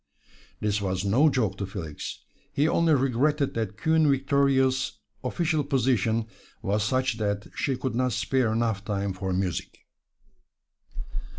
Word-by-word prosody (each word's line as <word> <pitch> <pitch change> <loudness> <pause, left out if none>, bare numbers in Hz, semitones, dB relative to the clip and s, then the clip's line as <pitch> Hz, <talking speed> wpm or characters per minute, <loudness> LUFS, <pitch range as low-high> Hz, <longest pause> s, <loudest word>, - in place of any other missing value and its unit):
This 105 0 0
was 95 -1 -1
no 130 +10 +5
joke 125 -8 0
to 100 - -2
Felix 85 -6 -6 0.3
he 145 +2 +2
only 165 -1 +3
regretted 140 +2 +1
that 110 -3 -3
Queen 160 -1 +3
Victoria's 135 -1 +2 0.3
official 155 +3 0
position 120 -5 +1 0.4
was 105 +2 +1
such 130 0 0
that 100 -1 -1
she 135 -3 -1
could 130 -1 -2
not 125 +1 +1
spare 130 +1 +1
enough 110 -3 0
time 100 -2 -2
for 95 0 -3
music. 90 -1 -2
120 Hz, 130 wpm, -27 LUFS, 100-135 Hz, 0.4 s, no